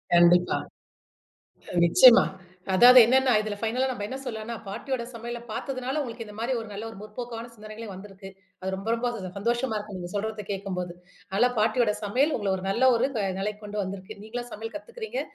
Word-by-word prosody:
கண்டிப்பா. 175 +1 +5 1.3
நிச்சயமா. 240 +8 +8 0.5
அதாவது 250 +5 +9
என்னன்னா 260 +2 +4
இதுல 215 -1 -4
ஃபைனலா 245 +4 0
நம்ம 225 -5 -5
என்ன 265 - -5
சொல்லான்னா, 225 -1 -5
பாட்டியோட 255 +4 -3
சமையல 235 +1 -6
பாத்ததுனால 260 +4 -3
உங்களுக்கு 230 -3 -6
இந்த 210 -1 -11
மாரி 240 +3 -1
ஒரு 225 - -9
நல்ல 205 +2 -6
ஒரு 225 - -11
முற்போக்கான 230 +2 -7
சிந்தனைகளே 215 +1 -9
வந்திருக்கு. 195 0 -10 0.3
அது 190 +1 -3
ரொம்ப 195 +3 -5
ரொம்ப 245 +1 -1 0.3
சந்தோஷமா 235 +2 0
இருக்கு. 205 -2 -7
நீங்க 175 -1 -6
சொல்றத 215 0 -3
கேட்கம்போது. 185 -3 -4 0.4
நல்லா 245 +4 +4
பாட்டியோட 220 0 +2
சமையல் 260 +9 +2
உங்கள 200 -3 -1
ஒரு 185 - -6
நல்ல 255 +6 +4
ஒரு 250 +4 +2 0.3
நிலைக்கு 210 +2 -3
கொண்டு 210 0 -3
வந்திருக்கு. 195 +2 -7
நீங்களா 240 +3 -5
சமையல் 225 +4 -7
கத்துக்கிறீங்க. 465 +7 -5
220 Hz, 165 wpm, -26 LUFS, 200-245 Hz, 1.3 s, அதாவது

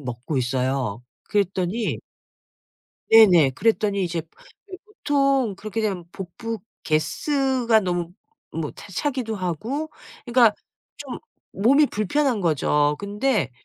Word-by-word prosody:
먹고 125 +2 -5
있어요. 125 -3 -1 0.2
그랬더니 200 +2 -1 1.1
네네. 185 -11 +7
그랬더니 205 - +1
이제 170 -1 -2 0.4
네 380 -2 -9
보통 275 - +1
그렇게 215 +2 -4
되면 195 -5 -2
복부 220 +5 -6 0.3
가스 265 - 0
가 225 -1 +5
너무 175 -3 -2 0.4
뭐 - - -3
차 - - -12
차기도 255 -7 -2
하고 220 - -3 0.3
그러니까 240 -4 +4 0.4
좀 - - -7 0.3
몸이 275 +9 +4
불편한 240 +2 0
거죠. 150 -3 +2
근데 205 - 0
205 Hz, 235 characters per minute, -23 LUFS, 170-250 Hz, 1.1 s, 네네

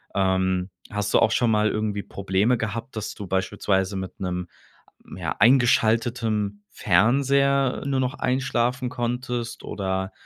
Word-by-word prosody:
Ähm, 95 -1 +1 0.2
hast 100 0 -2
du - - +6
auch 110 - +3
schon 120 0 +2
mal 105 0 +3
irgendwie 105 -1 -2
Probleme 100 +5 0
gehabt, 115 +3 -4
dass 110 - -5
du 100 - -7
beispielsweise 95 +1 0
mit 95 -1 -6
'nem, 90 -1 -3 0.7
ja, - - -3
eingeschaltetem 115 -3 +2
Fernseher 135 +7 +2
nur 135 -1 0
noch 130 +1 -1
einschlafen 125 -1 0
konntest 120 -1 -3
oder, 95 0 -3
110 Hz, 130 wpm, -24 LUFS, 95-125 Hz, 0.7 s, du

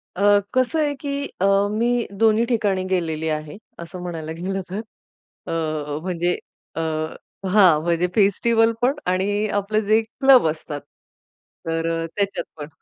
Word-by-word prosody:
अ, 205 +1 +5
कसं 255 +5 +1
आहे 290 -1 +1
की 280 -1 -3 0.2
अ, - - +4 0.3
मी 235 +2 +1
दोन्ही 225 +1 +4
ठिकाणी 210 -6 0
गेलेली 160 -4 -1
आहे, 155 +1 -4 0.2
असं 170 +2 -8
म्हणायला 165 -3 -5
गेलं 190 +2 -3
तर, 190 +3 -3 0.7
अ, 155 -2 -2
म्हणजे 175 -1 -1 0.4
अ, - - -3 0.7
हां, 180 -6 +5
म्हणजे 170 +1 +1
फेस्टिव्हल 225 +3 +3
पण 260 +3 +3
आणि 200 +3 +1
आपले 215 +2 0
जे 215 +2 +3
क्लब 260 - +4
असतात, 150 -2 -4 0.9
तर 165 0 -1 0.2
अ, - - -2
त्याच्यात 200 -1 -1
पण 150 -1 -6
195 Hz, 140 wpm, -22 LUFS, 165-225 Hz, 0.9 s, अ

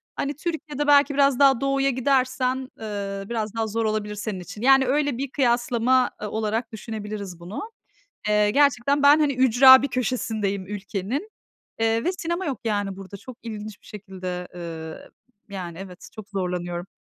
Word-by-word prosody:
hani, 285 +1 -2
Türkiye'de 300 -3 -4
belki 285 0 +5
biraz 275 -2 +3
daha 270 -3 +5
doğuya 275 0 +2
gidersen, 260 0 0
eee, 200 -2 -4
biraz 220 -3 -3
daha 225 -1 -1
zor 225 +1 -1
olabilir 215 -1 -2
senin 205 -2 -4
için. 180 +4 -9
Yani, 270 +1 +5
öyle, 285 0 +1
bir 270 0 -4
kıyaslama, 245 -1 +2
eee, 210 - -3
olarak 220 +2 -2
düşünebiliriz 210 -4 -6
bunu. 175 +5 -6 0.7
Eee, 210 0 +3
gerçekten 280 +2 +3
ben, 290 +2 +7
hani, 290 -2 +2
ücra 260 +1 +8
bir 280 - 0
köşesindeyim 220 -6 -2
ülkenin, 210 - -4 0.5
eee, 225 +1 +1
ve 360 - +1
sinema 345 0 -3
yok, 265 -7 -3
yani, 205 -3 -1
burada 195 +1 -9
çok 255 +4 -11
ilginç 215 -2 -7
bir - - -22
şekilde, 185 -3 -7
eee, 165 -2 -7 0.5
yani, 170 -3 -6
evet, 185 -2 -10
çok 215 -1 -10
zorlanıyorum. 180 -3 -3
225 Hz, 160 wpm, -24 LUFS, 200-270 Hz, 0.7 s, ücra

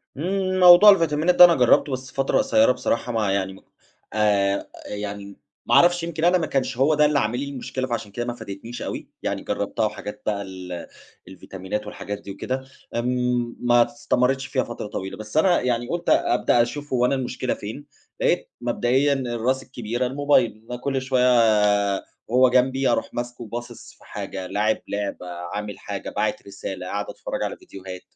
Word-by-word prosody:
امم، 185 +4 -1
موضوع 180 +3 +9
الڤيتامينات 165 +1 +1
ده 180 - +11
أنا 170 -1 +4
جرّبته 125 +2 +4
بس 130 0 -6
فترة 135 0 0
قصيّرة 275 +1 +4
بصراحة 115 +1 -1
ما 110 -4 0
يعني 95 -1 -1
م 95 - -14 0.5
آآ 100 -2 +1 0.2
يعني 100 -1 -6 0.3
ما - - +2
أعرفش 175 0 +5
يمكن 165 -1 -4
أنا 180 +1 +5
ما 160 -3 -2
كانش 135 -4 -1
هُو 140 +4 +3
ده 150 0 +4
اللي 150 -1 +2
عامل 120 +1 -1
لي 140 +1 -4
المشكلة 130 -1 -4
فعشان 115 -4 -4
كده 120 +4 -4
ما 120 - -3
فادِتنيش 115 +2 -8
أوي، - - -5
يعني - - -2
جربتها - - -1
وحاجات 105 0 -6
بقى 105 -2 -1
ال 90 -3 -7 0.4
الڤيتامينات 95 +3 -6
والحاجات 105 0 -6
دي 100 - -8
وكده 130 +7 -4 0.3
آمم 125 0 0
ما 120 -1 +4
استمرِتش 135 -1 0
فيها 130 -1 0
فترة 120 -2 -6
طويلة، 95 -1 -6
بس 110 +6 -6
أنا 175 +2 +4
يعني 120 -1 -1
قلت 170 0 -2
أبدأ 120 0 +3
أشوف 145 +4 -3
هُو 125 -1 +3
أنا 130 - +2
المشكلة 130 -1 -2
فين؟ 115 +8 -8 0.4
لقيت - - +1
مبدئيًا 125 +4 +2
الراس 130 0 -1
الكبيرة، 120 -1 -3
الموبايل 130 -5 +1
أنا 125 - -3
كل 135 -1 -1
شويّة 130 -1 +1 1.0
وهُو 125 +2 +4
جنبي 130 +1 +2
أروح - - -1
ماسكه 120 0 -5
وباصص 120 +1 -8
في - - -21
حاجة 95 -1 -6
لاعب 105 +3 +1
لعبة، 100 -3 -4 0.3
عامل 105 -1 -5
حاجة - - -6
باعت 105 -1 -2
رسالة، 95 -2 -6
قاعد 105 +2 -3
أتفرّج - - -5
على - - -3
ڤيديوهات 95 -1 -10
120 Hz, 175 wpm, -23 LUFS, 105-135 Hz, 1.0 s, ده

